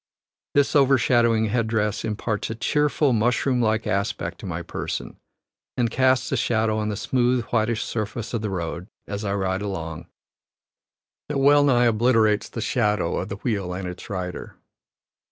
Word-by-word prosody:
This 145 Hz, +1 st, +3 dB
overshadowing 120 Hz, -5 st, +4 dB
head 115 Hz, +1 st, 0 dB
dress 110 Hz, -1 st, -1 dB
imparts 105 Hz, -1 st, -2 dB
a 110 Hz, -, -3 dB
cheerful, 150 Hz, +3 st, +1 dB
mushroom 120 Hz, +3 st, +1 dB
like 110 Hz, -1 st, +1 dB
aspect 100 Hz, +3 st, -2 dB
to -, -, -7 dB
my -, -, -4 dB
person, -, -, -5 dB, 0.6 s
and 120 Hz, -2 st, +1 dB
casts 130 Hz, 0 st, +2 dB
a 135 Hz, -, +1 dB
shadow 110 Hz, -2 st, +1 dB
on 105 Hz, 0 st, -1 dB
the 105 Hz, -, -2 dB
smooth 125 Hz, +2 st, +1 dB
whitish 110 Hz, 0 st, +1 dB
surface 110 Hz, +1 st, -4 dB
of 115 Hz, -, -1 dB
the 110 Hz, -, -2 dB
road, 85 Hz, -1 st, -4 dB, 0.2 s
as 100 Hz, +1 st, -5 dB
I 100 Hz, -1 st, -1 dB
ride 95 Hz, -1 st, -1 dB
along, 85 Hz, -4 st, -5 dB, 1.2 s
that 150 Hz, -, -1 dB
well 145 Hz, +1 st, +5 dB
nigh 125 Hz, -4 st, +4 dB
obliterates 115 Hz, -1 st, +3 dB
the 115 Hz, -, -5 dB
shadow 105 Hz, -6 st, 0 dB
of 95 Hz, -, -3 dB
the 100 Hz, -, -4 dB
wheel 100 Hz, -4 st, -2 dB
and 95 Hz, 0 st, -4 dB
its 90 Hz, 0 st, -8 dB
rider. 90 Hz, -3 st, -5 dB
110 Hz, 160 wpm, -24 LUFS, 100-120 Hz, 1.2 s, well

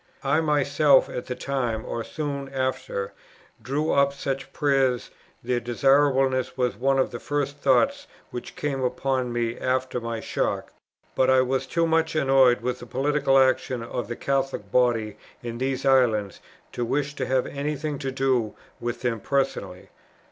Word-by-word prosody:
I 155 Hz, -, +2 dB
myself, 145 Hz, -2 st, +3 dB
at 125 Hz, -, -5 dB
that 125 Hz, 0 st, -5 dB
time, 120 Hz, -5 st, -2 dB
or 115 Hz, -, -3 dB
soon 140 Hz, 0 st, -4 dB
after, 130 Hz, -7 st, -3 dB, 0.5 s
drew 140 Hz, +7 st, -1 dB
up 140 Hz, 0 st, +3 dB
such 135 Hz, -1 st, -4 dB
prayers; 135 Hz, -4 st, +1 dB, 0.3 s
their 125 Hz, 0 st, 0 dB
desirableness 135 Hz, +1 st, +2 dB
was 125 Hz, -1 st, 0 dB
one 135 Hz, +2 st, +1 dB
of 130 Hz, -, +1 dB
the 120 Hz, -, -6 dB
first 145 Hz, +1 st, -2 dB
thoughts 270 Hz, -, +2 dB, 0.2 s
which 125 Hz, -, -7 dB
came 140 Hz, -2 st, -2 dB
upon 130 Hz, 0 st, -1 dB
me 120 Hz, 0 st, -2 dB
after 130 Hz, -1 st, -1 dB
my 115 Hz, -1 st, -3 dB
shock; -, -, -2 dB, 0.4 s
but 130 Hz, -, +2 dB
I 130 Hz, 0 st, +5 dB
was 130 Hz, +1 st, -1 dB
too 165 Hz, +3 st, +1 dB
much 160 Hz, 0 st, +1 dB
annoyed 135 Hz, -5 st, +4 dB
with 125 Hz, +1 st, -2 dB
the 120 Hz, -, -10 dB
political 135 Hz, +2 st, +2 dB
action 130 Hz, -2 st, +2 dB
of 120 Hz, +1 st, -4 dB
the 120 Hz, -, -4 dB
Catholic 135 Hz, -7 st, -2 dB
body 115 Hz, -4 st, +2 dB, 0.3 s
in 120 Hz, 0 st, -5 dB
these 135 Hz, +1 st, -2 dB
islands 115 Hz, -7 st, +3 dB, 0.3 s
to 120 Hz, -, -3 dB
wish 140 Hz, +4 st, -1 dB
to -, -, -3 dB
have 130 Hz, -1 st, +1 dB
any 145 Hz, +2 st, -3 dB
thing 145 Hz, -1 st, -4 dB
to 135 Hz, -2 st, -3 dB
do 130 Hz, -4 st, 0 dB, 0.2 s
with 120 Hz, +1 st, -4 dB
them 120 Hz, -2 st, 0 dB
personally. 135 Hz, +6 st, -2 dB
130 Hz, 160 wpm, -25 LUFS, 120-140 Hz, 0.5 s, I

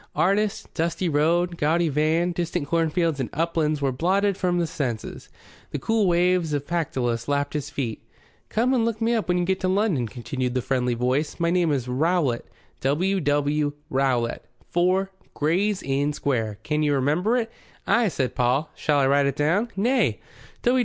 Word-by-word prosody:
Artist, 200 Hz, +3 st, 0 dB
dusty 170 Hz, +2 st, -1 dB
road, 170 Hz, +3 st, +1 dB
gaudy 165 Hz, +3 st, +2 dB
van, 155 Hz, +4 st, +1 dB
distant 170 Hz, -2 st, -2 dB
cornfields 165 Hz, -1 st, +1 dB
and 130 Hz, -, -2 dB
uplands 155 Hz, -2 st, 0 dB
were 135 Hz, -, +2 dB
blotted 190 Hz, +8 st, +1 dB
from 180 Hz, -1 st, 0 dB
his 170 Hz, -2 st, -1 dB
senses. 125 Hz, -10 st, -4 dB, 0.4 s
The -, -, -3 dB
cool 215 Hz, +8 st, +1 dB
waves 175 Hz, -2 st, +2 dB
of 145 Hz, -1 st, -1 dB
Pactolus 130 Hz, -9 st, -1 dB
lapped 145 Hz, 0 st, 0 dB
his 150 Hz, -1 st, -3 dB
feet. 130 Hz, -7 st, -4 dB, 0.5 s
"Come 240 Hz, +4 st, +1 dB
and 245 Hz, -3 st, +2 dB
look 225 Hz, -1 st, -1 dB
me 230 Hz, +1 st, +1 dB
up 225 Hz, -3 st, 0 dB
when 180 Hz, 0 st, +2 dB
you 175 Hz, -, +1 dB
get 190 Hz, +1 st, 0 dB
to 185 Hz, -, -1 dB
London," 185 Hz, -, +1 dB
continued 125 Hz, +3 st, -4 dB
the 125 Hz, -, +1 dB
friendly 125 Hz, -2 st, 0 dB
voice. 130 Hz, +8 st, -1 dB
"My 170 Hz, 0 st, +1 dB
name 175 Hz, -3 st, +2 dB
is 130 Hz, -4 st, -1 dB
Rowlatt 140 Hz, -1 st, 0 dB, 0.3 s
W. 180 Hz, +9 st, +1 dB
W. 145 Hz, -1 st, +1 dB, 0.2 s
Rowlatt, 130 Hz, -3 st, 0 dB, 0.3 s
4, 185 Hz, +2 st, +2 dB, 0.2 s
Gray's 185 Hz, +7 st, +1 dB
Inn 140 Hz, +2 st, 0 dB
Square. 115 Hz, -8 st, -1 dB
Can 150 Hz, 0 st, 0 dB
you 145 Hz, -1 st, +2 dB
remember 160 Hz, -, +1 dB
it?" 230 Hz, -2 st, -2 dB, 0.3 s
"Ay," 235 Hz, -1 st, +3 dB
said 135 Hz, -8 st, -1 dB
Paul. 130 Hz, +5 st, +1 dB
"Shall 150 Hz, -1 st, 0 dB
I 140 Hz, -, +3 dB
write 140 Hz, +1 st, +3 dB
it 140 Hz, -, -1 dB
down?" 175 Hz, +11 st, +1 dB
"Nay. 240 Hz, +7 st, +1 dB
155 Hz, 175 wpm, -24 LUFS, 140-180 Hz, 0.5 s, Ay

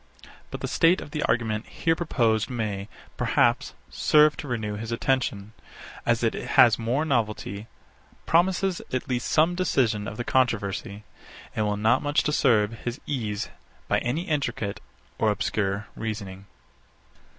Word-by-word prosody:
But -, -, -7 dB
the -, -, -2 dB
state 165 Hz, +3 st, +3 dB
of 145 Hz, -, -9 dB
the 150 Hz, -, -3 dB
argument 115 Hz, -1 st, 0 dB
here 165 Hz, -1 st, 0 dB
proposed 115 Hz, -9 st, +1 dB
may, 105 Hz, -5 st, -3 dB, 0.3 s
perhaps, -, -, +1 dB, 0.2 s
serve 150 Hz, 0 st, +4 dB
to 150 Hz, -, -6 dB
renew 110 Hz, -4 st, -2 dB
his 110 Hz, +2 st, -5 dB
attention; 115 Hz, -4 st, -1 dB, 0.5 s
as -, -, +2 dB
it -, -, +2 dB
has 120 Hz, 0 st, +4 dB
more 125 Hz, +7 st, 0 dB
novelty, 110 Hz, -5 st, -2 dB, 0.6 s
promises 180 Hz, +2 st, +2 dB
at 130 Hz, -, -2 dB
least 125 Hz, -1 st, -1 dB
some 160 Hz, +3 st, +3 dB
decision 120 Hz, -, +1 dB
of 105 Hz, -, -6 dB
the 120 Hz, -, -2 dB
controversy, 105 Hz, -5 st, 0 dB, 0.5 s
and 105 Hz, -1 st, 0 dB
will 105 Hz, 0 st, -1 dB
not 110 Hz, +2 st, +3 dB
much 145 Hz, 0 st, +1 dB
disturb 115 Hz, -7 st, +2 dB
his 120 Hz, +3 st, -4 dB
ease 110 Hz, -8 st, -3 dB, 0.4 s
by -, -, +2 dB
any 130 Hz, +8 st, -2 dB
intricate 130 Hz, -, -2 dB, 0.4 s
or 110 Hz, -, +3 dB
obscure 100 Hz, 0 st, -1 dB
reasoning. 100 Hz, -3 st, -6 dB
115 Hz, 140 wpm, -26 LUFS, 105-145 Hz, 0.6 s, serve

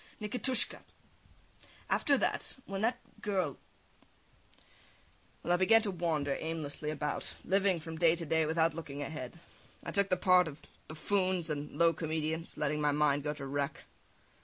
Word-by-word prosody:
Nikitushka! 250 Hz, +4 st, -1 dB, 1.1 s
After 280 Hz, -1 st, +3 dB
that... -, -, -1 dB
when 195 Hz, 0 st, -4 dB
that 235 Hz, +3 st, +2 dB, 0.2 s
girl... 185 Hz, -9 st, -1 dB, 1.8 s
well, 175 Hz, -, +2 dB
I -, -, +4 dB
began 225 Hz, +5 st, +5 dB
to 205 Hz, -, 0 dB
wander 160 Hz, -6 st, 0 dB
aimlessly 155 Hz, -2 st, -3 dB
about, 150 Hz, -1 st, -3 dB
living 190 Hz, -1 st, +3 dB
from 160 Hz, 0 st, -7 dB
day 165 Hz, -1 st, +5 dB
to 170 Hz, -1 st, -5 dB
day 160 Hz, 0 st, +2 dB
without 160 Hz, +1 st, +2 dB
looking 145 Hz, -3 st, -5 dB
ahead. 145 Hz, +1 st, -6 dB, 0.4 s
I -, -, -4 dB
took 200 Hz, -1 st, +2 dB
the 185 Hz, -, +3 dB
parts 180 Hz, -1 st, +5 dB
of 145 Hz, +1 st, -12 dB, 0.2 s
buffoons 185 Hz, +1 st, 0 dB
and 145 Hz, 0 st, -4 dB
low 170 Hz, 0 st, +5 dB
comedians, 160 Hz, 0 st, -3 dB
letting 150 Hz, 0 st, 0 dB
my 150 Hz, -1 st, +3 dB
mind 145 Hz, -1 st, +3 dB
go 150 Hz, 0 st, -2 dB
to 140 Hz, -2 st, -6 dB
wreck. 140 Hz, +1 st, -2 dB
160 Hz, 150 wpm, -32 LUFS, 150-185 Hz, 1.8 s, began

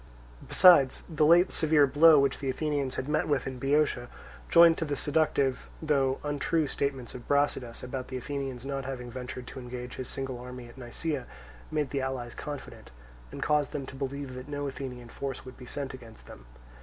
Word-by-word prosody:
Besides 155 Hz, -8 st, +6 dB
the 155 Hz, -2 st, +2 dB
late 175 Hz, +3 st, +6 dB
severe 155 Hz, -3 st, +4 dB
blow 150 Hz, +3 st, +7 dB
which 140 Hz, -1 st, +2 dB
the 135 Hz, -, -2 dB
Athenians 140 Hz, -1 st, -1 dB
had 130 Hz, -, -3 dB
met 150 Hz, +1 st, +1 dB
with 145 Hz, -4 st, +1 dB
in 130 Hz, -1 st, -5 dB
Boeotia, 140 Hz, -2 st, +1 dB, 0.4 s
joined 170 Hz, -1 st, +7 dB
to 165 Hz, -, -1 dB
the 145 Hz, -2 st, -2 dB
seductive, 145 Hz, -3 st, +1 dB
though 135 Hz, -4 st, +1 dB
untrue, 150 Hz, +2 st, 0 dB
statements 135 Hz, -3 st, -3 dB
of 125 Hz, -, -10 dB
Brasidas, 140 Hz, -4 st, 0 dB
about 125 Hz, 0 st, -5 dB
the 130 Hz, -, -5 dB
Athenians 135 Hz, -1 st, -5 dB
not 135 Hz, -1 st, -3 dB
having 125 Hz, -2 st, -5 dB
ventured 125 Hz, 0 st, -6 dB
to 130 Hz, -, -8 dB
engage 125 Hz, 0 st, -7 dB
his 130 Hz, -, -4 dB
single 135 Hz, -2 st, -4 dB
army 125 Hz, 0 st, -8 dB
at 120 Hz, -, -14 dB
Nisaea, 130 Hz, +2 st, -4 dB, 0.4 s
made 150 Hz, -2 st, -1 dB
the 140 Hz, -, -1 dB
allies 130 Hz, -3 st, -3 dB
confident, 145 Hz, -2 st, -8 dB, 0.4 s
and -, -, -5 dB
caused 150 Hz, -1 st, +1 dB
them 140 Hz, -, -3 dB
to 130 Hz, -, -10 dB
believe 135 Hz, 0 st, -4 dB
that 130 Hz, +2 st, -8 dB
no 145 Hz, 0 st, -3 dB
Athenian 125 Hz, -3 st, -7 dB
force 135 Hz, +2 st, -5 dB
would 130 Hz, -, -10 dB
be 125 Hz, -, -12 dB
sent 140 Hz, 0 st, -3 dB
against 115 Hz, -4 st, -12 dB
them. -, -, -13 dB
135 Hz, 190 wpm, -29 LUFS, 125-145 Hz, 0.4 s, blow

